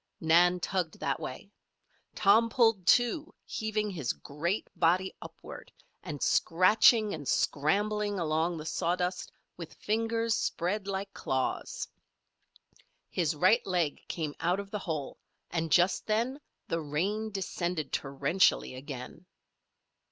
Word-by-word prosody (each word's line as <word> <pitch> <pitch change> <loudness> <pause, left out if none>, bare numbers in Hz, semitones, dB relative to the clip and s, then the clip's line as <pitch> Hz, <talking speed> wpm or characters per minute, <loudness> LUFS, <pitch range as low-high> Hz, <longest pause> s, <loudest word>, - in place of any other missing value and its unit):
Nan 175 +2 +4
tugged 180 -3 -2
that - - -1
way. - - -7 0.6
Tom 220 +3 +4
pulled, 225 -7 +2
too, 250 +6 +3
heaving 215 -1 -2
his 155 -10 -2
great 170 +8 -3
body 180 +3 +2
upward, - - -10 0.3
and 150 -5 -5
scratching 210 +4 +4
and 145 -4 -6
scrambling 205 - +1
along 165 +1 0
the 155 - -7
sawdust 180 +2 -1 0.3
with 170 -2 -9
fingers 225 +1 0
spread 195 +1 -1
like 195 0 -4
claws. 130 -1 -2 1.2
His 165 -3 0
right 185 +10 +4
leg 175 -5 0
came 155 -4 -3
out 175 +4 +1
of 200 0 -7
the 210 - -3
hole, 155 -7 -4 0.3
and 165 -2 -2
just 175 +4 +3
then 235 +6 0 0.3
the 165 - -1
rain 195 +9 -1
descended 180 -5 -3
torrentially 140 +4 +1
again. 135 +5 -8
180 Hz, 120 wpm, -30 LUFS, 160-210 Hz, 1.2 s, Nan